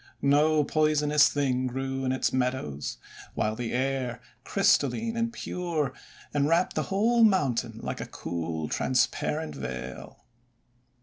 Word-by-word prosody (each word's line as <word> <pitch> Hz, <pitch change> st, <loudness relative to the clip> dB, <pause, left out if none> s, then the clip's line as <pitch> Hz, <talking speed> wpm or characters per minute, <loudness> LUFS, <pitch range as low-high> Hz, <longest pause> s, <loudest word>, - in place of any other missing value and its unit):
No 150 Hz, +2 st, +4 dB
poisonous 150 Hz, -1 st, +3 dB
thing 130 Hz, -3 st, 0 dB
grew 135 Hz, +1 st, -3 dB
in 130 Hz, -, +1 dB
its 130 Hz, -, 0 dB
meadows; 125 Hz, -, -2 dB, 0.4 s
while 110 Hz, 0 st, 0 dB
the 120 Hz, 0 st, -4 dB
air, 130 Hz, -1 st, -1 dB, 0.2 s
crystal -, -, +3 dB
line 230 Hz, 0 st, -3 dB
and 230 Hz, 0 st, 0 dB
pure, 165 Hz, -, -2 dB, 0.4 s
enwrapped 155 Hz, +5 st, +2 dB
the -, -, 0 dB
whole 230 Hz, +4 st, +3 dB
mountain 125 Hz, -, +2 dB
like -, -, -4 dB
a -, -, -5 dB
cool, 80 Hz, -2 st, -4 dB
transparent 150 Hz, -, 0 dB
veil. 65 Hz, 0 st, -7 dB
135 Hz, 125 wpm, -27 LUFS, 125-155 Hz, 0.4 s, No